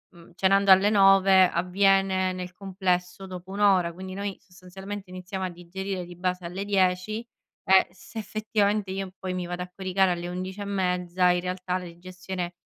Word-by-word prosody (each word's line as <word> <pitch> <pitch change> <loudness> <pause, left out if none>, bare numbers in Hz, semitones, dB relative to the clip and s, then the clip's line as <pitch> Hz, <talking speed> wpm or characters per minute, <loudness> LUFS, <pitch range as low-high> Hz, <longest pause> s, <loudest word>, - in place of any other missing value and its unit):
mhmm, 170 -1 -16
cenando 195 +1 +4
alle 190 +2 +7
9, 195 -2 +6
avviene 190 +1 +2
nel 180 0 -6
complesso 185 -1 -2
dopo 185 0 -9
1 200 - -5
ora, 185 -4 +3
quindi 185 +1 -8
noi 200 -1 -4
sostanzialmente 190 +1 -9
iniziamo 185 +1 -5
a - - -2
digerire 180 +2 -6
di 175 0 -11
base 180 0 -2
alle 190 +4 -5
10 195 +3 +1 0.5
e 190 0 +7
se 190 +5 -14
effettivamente, 210 -2 -1
io 195 -1 -4
poi 185 -1 -4
mi 180 -1 -3
vado 180 +1 -5
a 180 - -10
coricare 190 -1 +1
alle 175 0 -3
11 185 +3 -5
e - - -2
mezza 180 -2 +1
in 175 - 0
realtà 180 0 -3
la 180 - -7
digestione 180 +1 -6
185 Hz, 175 wpm, -26 LUFS, 180-195 Hz, 0.5 s, alle